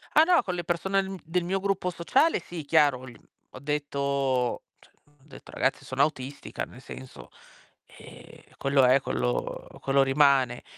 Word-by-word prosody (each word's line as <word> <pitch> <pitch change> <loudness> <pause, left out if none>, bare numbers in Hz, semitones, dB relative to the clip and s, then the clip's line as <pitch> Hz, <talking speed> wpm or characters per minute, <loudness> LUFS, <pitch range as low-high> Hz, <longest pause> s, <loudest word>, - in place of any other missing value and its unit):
Ah 310 - +8
no, 355 0 +4
con 185 - -3
le 175 -1 -4
persone 190 +3 0
n 190 0 -6
del 170 +2 -1
mio 190 +2 -1
gruppo 195 -2 -1
sociale 260 - +2
sì, 165 -2 -8
chiaro, 140 -2 +3
gl 130 -2 -11 0.4
ho - - -11
detto, 140 -3 -1 0.2
cioè - - -24
ho 145 - -29
detto: 135 - -14
"C - - -11
ragazzi, 130 - 0
sono 130 +1 0
autistica", 140 -2 -3
nel 125 - -14
senso, 130 -1 -11 0.6
ehm, - - -15 0.2
quello 135 -1 +2
è 130 +2 +5
quello - - -2
uhm, - - -14
quello 135 0 +3
rimane. 135 -3 +3
140 Hz, 175 wpm, -27 LUFS, 130-175 Hz, 0.6 s, Ah